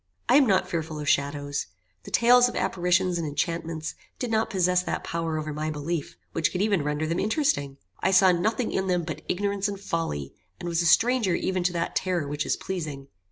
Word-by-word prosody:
I - - +5
am 280 -3 +5
not 190 -2 +3
fearful 160 -3 -3
of 150 - -5
shadows. 145 0 0 0.4
The - - -8
tales 245 +1 +5
of - - -8
apparitions 180 0 +1
and 165 - -2
enchantments 160 +1 -2 0.2
did 245 -3 -3
not 220 0 +1
possess 180 -3 +2
that 180 - -3
power 165 -1 -2
over 155 -1 -3
my 155 +1 -2
belief 155 +1 -4
which 165 - 0
could 180 - -3
even 200 -7 +2
render 150 +1 -1
them 165 +2 -1
interesting. 210 - 0 0.2
I 190 - +1
saw 190 0 +6
nothing 220 +7 0
in 190 0 -1
them 180 -2 +1
but 160 -1 -5
ignorance 200 +1 0
and 200 -1 -5
folly, 165 - -3 0.3
and - - -5
was 170 0 +1
a 170 - +1
stranger 225 0 +4
even 185 +1 -1
to 180 - +2
that 170 -1 -2
terror 180 -5 0
which 145 +1 -3
is - - +1
pleasing. 150 -7 -5
175 Hz, 205 wpm, -26 LUFS, 155-190 Hz, 0.4 s, saw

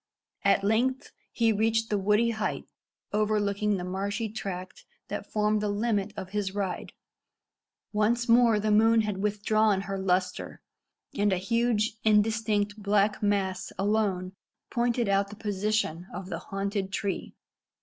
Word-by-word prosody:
At 195 - +3
length 250 +6 +1 0.2
he 230 -1 +2
reached 225 +1 +1
the 205 - +2
woody 210 +4 +3
height 220 -1 -3 0.5
overlooking 210 -1 +1
the 180 - -4
marshy 200 +4 -2
tract 185 -3 -6 0.3
that - - -5
formed 210 0 +1
the 210 - 0
limit 205 -1 0
of 185 - -5
his 200 -2 -2
ride. 195 -3 -3 1.0
Once 230 +3 +1
more 230 -2 +5
the 215 +1 0
moon 225 +2 +5
had 205 -3 -3
withdrawn 210 0 +2
her 195 0 -4
lustre, 185 -1 -1 0.5
and 205 -6 +1
a 185 - +2
huge 220 +2 0
indistinct 210 -1 +2
black 205 0 +2
mass 195 -2 0
alone 195 -3 0 0.4
pointed 240 -1 +1
out 200 0 +2
the 210 - -9
position 205 -4 -1
of 185 - -7
the 165 -3 -3
haunted 195 +1 -3
tree. 200 -1 -3
210 Hz, 140 wpm, -28 LUFS, 195-220 Hz, 1.0 s, more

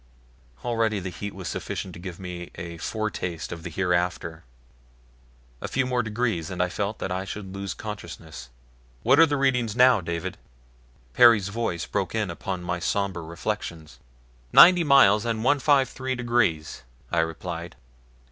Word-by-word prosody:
Already 115 -3 +1
the 95 0 -5
heat 100 +4 -6
was 95 -2 -7
sufficient 95 - -4
to - - -10
give 90 0 -8
me 90 -2 -7
a 85 -1 -7
foretaste 90 -5 -3
of 85 - -6
the 85 - -6
hereafter. 85 -2 -1 1.2
A - - -3
few 135 0 0
more 125 -1 +1
degrees 110 -7 -2
and 90 - -6
I 90 0 +2
felt 100 +3 -3
that 95 - -4
I 95 +1 -2
should 95 -1 -7
lose 100 -1 -5
consciousness. 85 - -8 0.5
"What 130 +5 +5
are 165 - +8
the 145 -1 0
readings 125 -5 +1
now, 125 -4 +6
David?" 85 +2 -4 0.7
Perry's 115 -5 +6
voice 100 -6 -2
broke 100 0 -2
in 105 -5 -1
upon 90 +1 -5
my 85 0 -2
somber 95 -1 -1
reflections. 85 -2 -5 0.5
"Ninety 175 -1 +8
miles 135 -8 +6
and 115 -2 -2
153 130 -1 +2
degrees," 115 -11 0 0.3
I 85 - +2
replied. 80 -1 -4
100 Hz, 150 wpm, -25 LUFS, 85-115 Hz, 1.2 s, are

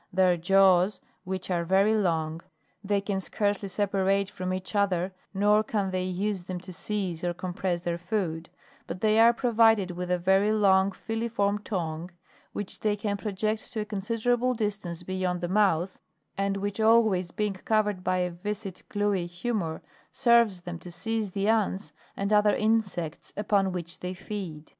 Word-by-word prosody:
Their 185 -1 +4
jaws, 190 +2 +4 0.3
which 185 0 -4
are 170 -1 +1
very 195 +5 +3
long, 165 -5 0 0.4
they 200 0 +1
can 195 -1 -2
scarcely 205 0 -1
separate 195 0 +1
from 185 -2 -4
each 185 +2 -4
other, 190 -2 +1 0.2
nor 205 +2 +3
can 205 -3 -1
they 185 0 -1
use 185 0 -2
them 185 -1 -4
to 185 0 -9
seize 190 -3 -3
or 175 0 -1
compress 180 -1 -3
their 170 -1 -2
food; 175 -3 -2 0.4
but 185 - -6
they 215 0 +3
are 230 +1 +8
provided 225 -5 +3
with 180 0 -5
a 180 - +2
very 190 +4 +3
long 195 -2 +4
filiform 210 -1 -2
tongue, 170 -4 -3 0.4
which 205 -2 -6
they 210 -1 +1
can 205 -1 -2
project 215 +1 -2
to 220 - -1
a - - -3
considerable 230 +4 0
distance 200 -6 -3
beyond 185 -1 -2
the 175 - -2
mouth, 190 -2 +1 0.4
and 195 0 0
which 200 +1 -3
always 220 -5 +4
being 210 +2 -1
covered 210 +1 0
with 180 - -14
a 180 -1 +1
viscid, 195 +1 -5
gluey 205 -4 0
humor, 175 -2 -3 0.3
serves 235 -6 +3
them 175 -1 -6
to 175 - -9
seize 215 +4 -2
the 195 +2 -2
ants 195 -7 0 0.2
and 200 +2 0
other 210 0 +4
insects 215 -8 -1
upon 200 -2 +2
which 170 -1 -6
they 180 +1 -5
feed. 180 -6 -6
195 Hz, 165 wpm, -27 LUFS, 180-210 Hz, 0.4 s, are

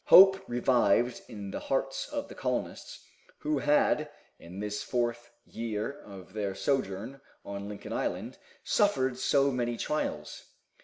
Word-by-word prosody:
Hope 190 +1 +9
revived 120 -1 +3
in 100 -3 -7
the - - -3
hearts 135 0 -1
of - - -3
the - - -10
colonists, - - -4 0.4
who 150 -1 0
had, 150 +2 +3 0.3
in 90 +3 -10
this 105 0 -3
fourth 120 -1 -1 0.2
year 115 +3 -4
of 95 -2 -12
their 100 -3 -2
sojourn 130 +1 -1 0.2
on 100 0 -5
Lincoln 105 - -7
island, - - -3 0.2
suffered 130 -11 +2
so 140 +1 +3
many 120 -2 -1
trials. 75 - -3
120 Hz, 135 wpm, -30 LUFS, 105-135 Hz, 0.4 s, Hope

